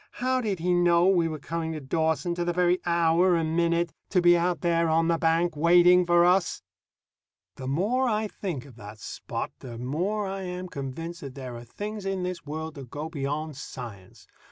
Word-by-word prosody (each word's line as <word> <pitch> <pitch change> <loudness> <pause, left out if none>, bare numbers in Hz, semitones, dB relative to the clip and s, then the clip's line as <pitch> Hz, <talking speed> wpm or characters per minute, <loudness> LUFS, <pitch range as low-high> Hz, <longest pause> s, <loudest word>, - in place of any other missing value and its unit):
How 255 +1 0
did 205 -5 -1
he 180 +2 0
know 175 0 +4
we 175 -4 +3
were 155 -1 -4
coming 160 +2 -4
to 155 - -4
Dawson, 160 +4 0
to 175 0 -2
the 175 - 0
very 180 +1 +2
hour 170 +1 +3
and 160 -1 0
minute, 170 0 +1 0.2
to 185 - +3
be 175 0 +6
out 175 -2 0
there 170 -1 +2
on 165 +1 +3
the 165 -1 +2
bank 165 +1 +2
waiting 175 +3 +5
for 175 0 +5
us? 180 0 +2 0.9
The 130 - -6
more 215 - +1
I 215 0 0
think 175 -11 -5
of 130 -5 -15
that 105 0 -10
Spot, - - -5
the 120 -3 -8
more 175 - -1
I 195 0 -4
am 180 0 -5
convinced 165 +5 -6
that 140 -2 -8
there 130 -3 -7
are 120 - -8
things 210 - -6
in 190 -1 -1
this 180 -1 -4
world 160 +1 -5
that 135 -5 -10
go 150 +4 -5
beyond 150 0 -3
science. 115 -9 -9
170 Hz, 200 wpm, -27 LUFS, 150-180 Hz, 0.9 s, be